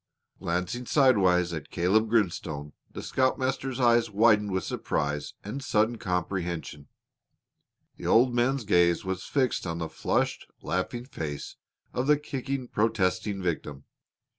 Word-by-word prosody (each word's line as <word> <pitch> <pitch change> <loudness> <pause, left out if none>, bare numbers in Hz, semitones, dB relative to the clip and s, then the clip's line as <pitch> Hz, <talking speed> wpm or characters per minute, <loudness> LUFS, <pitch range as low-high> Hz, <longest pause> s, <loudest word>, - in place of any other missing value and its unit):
Glancing 90 +8 -2
sidewise 95 - +4
at 75 -4 -6
Caleb 105 +6 +2
Grimstone, 80 -9 -1 0.2
the - - -8
scoutmaster's 130 0 0
eyes 120 -2 +4
widened 105 0 +4
with 95 -1 -1
surprise 75 0 -2
and 125 +7 -5
sudden 110 -1 +1
comprehension. 85 -6 -3 1.1
The - - -6
old 120 +2 +5
man's 125 +2 +1
gaze 85 -3 +3
was 95 0 -3
fixed 130 -8 0
on 85 0 -3
the 80 -1 -4
flushed, - - -1 0.2
laughing 120 +7 -2
face 75 - -6 0.4
of 125 +2 -1
the 150 0 +5
kicking, 140 -3 -4
protesting 100 -2 0
victim. 75 -5 -3
105 Hz, 125 wpm, -28 LUFS, 85-125 Hz, 1.1 s, old